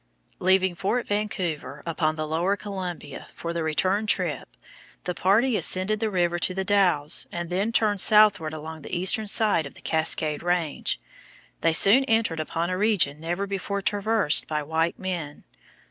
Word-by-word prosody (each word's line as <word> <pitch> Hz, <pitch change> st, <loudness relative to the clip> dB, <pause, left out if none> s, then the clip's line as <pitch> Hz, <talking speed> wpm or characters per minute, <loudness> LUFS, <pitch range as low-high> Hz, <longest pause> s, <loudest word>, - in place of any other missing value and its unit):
Leaving 190 Hz, 0 st, +2 dB
Fort 200 Hz, +8 st, -2 dB
Vancouver, 195 Hz, -7 st, -3 dB
upon 160 Hz, -2 st, -1 dB
the 155 Hz, 0 st, -3 dB
lower 175 Hz, +6 st, 0 dB
Columbia, 185 Hz, -7 st, -7 dB
for 170 Hz, 0 st, -5 dB
the 170 Hz, -, -3 dB
return 185 Hz, +7 st, 0 dB
trip, 175 Hz, -, -2 dB, 0.5 s
the 180 Hz, -, -3 dB
party 210 Hz, +8 st, +2 dB
ascended 205 Hz, +2 st, +2 dB
the 220 Hz, -1 st, -1 dB
river 175 Hz, -3 st, 0 dB
to 185 Hz, +2 st, 0 dB
The 190 Hz, -, -2 dB
Dalles 185 Hz, -7 st, +1 dB
and 175 Hz, 0 st, -5 dB
then 195 Hz, +5 st, -1 dB
turned 210 Hz, -4 st, +2 dB
southward 205 Hz, -7 st, +5 dB
along 160 Hz, 0 st, -8 dB
the 175 Hz, -, -5 dB
eastern 190 Hz, +4 st, +2 dB
side 200 Hz, -7 st, +3 dB
of -, -, -15 dB
the -, -, -14 dB
Cascade 160 Hz, -1 st, 0 dB
Range. 175 Hz, -3 st, -2 dB, 0.6 s
They 165 Hz, -, +2 dB
soon 205 Hz, +10 st, +6 dB
entered 225 Hz, -9 st, +1 dB
upon 165 Hz, +3 st, -3 dB
a 185 Hz, -, -2 dB
region 180 Hz, -9 st, +2 dB
never 175 Hz, +5 st, -3 dB
before 200 Hz, 0 st, -4 dB
traversed 205 Hz, -5 st, +1 dB
by 150 Hz, -1 st, -2 dB
white 160 Hz, +3 st, -1 dB
men. 175 Hz, -6 st, -5 dB
180 Hz, 160 wpm, -25 LUFS, 160-205 Hz, 0.6 s, soon